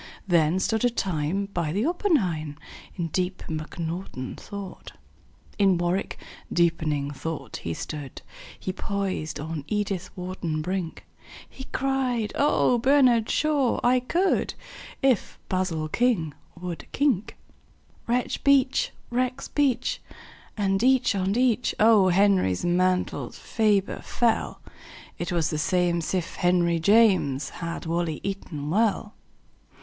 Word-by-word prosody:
Then 170 -1 +3
stood 220 +4 0
a 245 - +5
time 185 -3 -1
by 170 -3 -1
the 205 +8 0
oppenheim 190 - 0 0.4
In 170 -2 -3
deep 185 +3 -2
mcnaughton 160 -3 -5
thought. 200 -2 -9 0.7
In 195 -3 +4
warwick 175 +3 -1 0.3
deeping 155 -4 +1
thought 160 +2 -5
he 85 -1 -4
stood 145 -4 -7 0.4
He 185 - -3
poised 195 -6 -3
on 155 -1 -4
edithwharton 185 -5 -3
brink; 180 -1 -4 0.4
He 265 - -10
cried, 260 -6 -1
"Ohbernardshaw! 265 +1 +3
I 250 +1 +4
could 350 +10 0 0.5
If 260 -5 +2
basilking 180 0 0 0.3
would 175 -2 -6
kink." 265 -8 0 0.7
Rexbeach! 260 +2 +2 0.2
rexbeach! 255 +1 0 0.6
and 195 -1 +1
each 260 -2 +4
on 195 +2 0
each 250 -1 +2
O. 215 -3 +6
Henry's 185 - +3
mantles 180 +1 0
ferber 210 -3 +1
fell. 235 -2 0 0.6
It 175 - -3
was 165 -3 +1
the 155 - -1
same'sif 175 +1 0
henryjames 175 -4 +3
Had 170 0 -5
wally 165 -1 -1
eaton 160 -7 -4
well. 215 +1 +1
190 Hz, 105 wpm, -26 LUFS, 165-230 Hz, 0.7 s, O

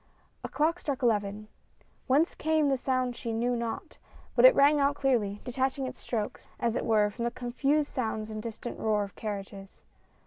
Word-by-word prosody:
A - - -4
clock 325 +4 +1
struck 280 -3 -3
eleven. 210 -2 0 0.6
Whence 290 +6 +3
came 310 -2 +1
the 270 - +3
sound 255 -1 -1
she 235 -1 -4
knew 240 +2 0
not, 235 -1 -5 0.4
but - - +6
it - - +9
rang 290 +1 +5
out 280 0 +2
clearly, 225 -8 0
detaching 265 +2 -1
its 255 - -7
strokes, 215 -4 -4
as 235 -1 0
it - - -1
were, 210 -2 +3
from 235 - -5
the 235 - +1
confused 275 +5 -1
soun^ls 220 -3 -2
and 215 0 -5
distant 230 +1 -6
roar 210 -2 +1
of 200 - -9
carriages. 195 -2 -7
240 Hz, 180 wpm, -29 LUFS, 215-275 Hz, 0.6 s, it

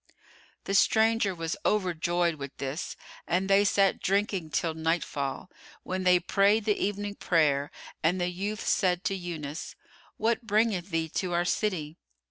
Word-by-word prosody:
The 195 - -3
stranger 220 -1 +3
was 165 -1 -3
overjoyed 175 -3 +1
with 140 -3 -8
this 140 +5 -4 0.3
and 185 +3 +1
they 195 +1 +5
sat 195 -1 +2
drinking 195 -4 0
till 160 +3 -1
nightfall, 160 -1 -2 0.3
when 185 0 -3
they 180 -1 +6
prayed 200 +4 +2
the 210 - +3
evening 205 0 -2
prayer 150 -7 +1 0.3
and 175 +4 +2
the 175 - 0
youth 200 +4 -4
said 180 -1 +1
to 195 - 0
Yunus, 165 -5 -6 0.4
"What 230 +2 +1
bringeth 210 -4 +1
thee 165 -2 -1
to 180 -2 -2
our 175 0 +1
city?" 175 -6 -1
180 Hz, 145 wpm, -28 LUFS, 165-200 Hz, 0.4 s, they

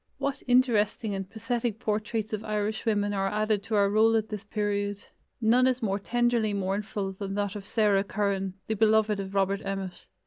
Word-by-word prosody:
What 280 0 -2
interesting 230 -4 +2
and 195 -1 -4
pathetic 230 +1 -2
portraits 215 0 -2
of 215 0 -2
Irishwomen 210 -1 -1
are 195 -1 0
added 215 0 0
to 220 - -1
our 200 -1 +4
roll 220 +2 +4
at 220 -1 0
this 210 -2 -5
period! 205 -1 -2 0.3
None 245 +3 +4
is 255 -1 0
more 200 -1 0
tenderly 235 -1 +1
mournful 200 0 -2
than 195 0 -5
that 205 0 -1
of 205 -1 -7
Sarah 205 -3 +3
Curran, 195 -2 -1
the 220 - -1
beloved 215 -1 +3
of 195 0 -5
Robert 195 +1 +1
Emmet. 195 -2 -5
210 Hz, 175 wpm, -28 LUFS, 200-220 Hz, 0.3 s, our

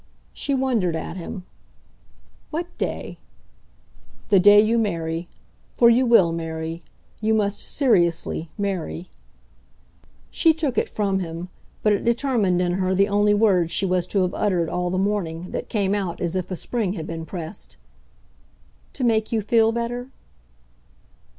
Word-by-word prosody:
She 280 - -2
wondered 235 -10 +1
at 160 - -5
him. 180 +1 -7 1.1
"What 340 +3 -5
day?" - - -4 1.1
"The 200 -3 +6
day 205 +2 +8
you 225 +2 +3
marry. 165 -5 -2 0.5
For 235 -1 +6
you 250 +2 +3
WILL 195 -8 +5
marry. 165 0 -4 0.4
You 220 0 +1
must 205 -1 0
SERIOUSLY 170 - +1
marry." 185 -3 -3 1.2
She 325 -2 +3
took 300 -6 0
it - - -2
from 195 -2 0
him, 170 0 -5 0.3
but 210 - +4
it 200 - -1
determined 235 -6 +1
in 175 - 0
her 185 +1 0
the 200 +2 +3
only 205 0 +3
words 190 -6 +3
she 195 - +1
was 180 -1 0
to 195 -1 +1
have 180 - -1
uttered, 180 -5 0
all 180 0 -1
the 185 - -1
morning, 180 -4 -2
that - - -5
came 200 -3 0
out 190 -4 -2
as 175 0 -2
if 185 -2 -2
a 185 - -3
spring 210 0 -2
had 160 -6 -5
been 165 -1 -5
pressed. 170 +2 -8 1.2
"To 265 - -4
make 220 -2 +1
you 220 -2 0
feel 225 +1 +3
better?" 235 +2 -3
195 Hz, 150 wpm, -23 LUFS, 175-225 Hz, 1.2 s, day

